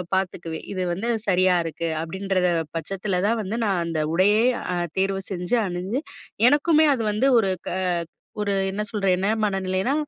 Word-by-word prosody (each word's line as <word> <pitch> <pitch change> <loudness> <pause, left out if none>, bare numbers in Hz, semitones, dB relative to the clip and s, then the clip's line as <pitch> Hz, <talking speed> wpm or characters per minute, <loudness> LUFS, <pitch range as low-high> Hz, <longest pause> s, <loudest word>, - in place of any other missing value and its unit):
பார்த்துக்குவேன். 175 -4 -3
"இது 185 -1 -2
வந்து 225 +7 -3 0.2
சரியா 185 -1 +4
இருக்கு." 165 +1 -3
அப்பிடின்றத 190 +1 0 0.3
பட்சத்தில 185 +2 -2
தான் 230 +1 +1
வந்து 210 +4 -3
நான் 190 -4 +1
அந்த 165 -2 -2 0.2
உடையே 205 +5 +4 0.3
அ - - -1 0.2
தேர்வு 195 0 0
செஞ்சு 180 +5 -1
அணிஞ்சு 185 +8 -2 0.5
எனக்குமே 300 +3 +4
அது 240 - -3
வந்து 230 +6 +2
ஒரு 195 -4 +1 0.2
க - - -2 0.7
ஒரு 205 -1 0 0.2
என்ன 210 +2 -3
சொல்ற 205 -2 -2
என்ன 190 +2 -1 0.2
மனநிலைனா, 195 +4 0
190 Hz, 155 wpm, -24 LUFS, 180-210 Hz, 0.7 s, சரியா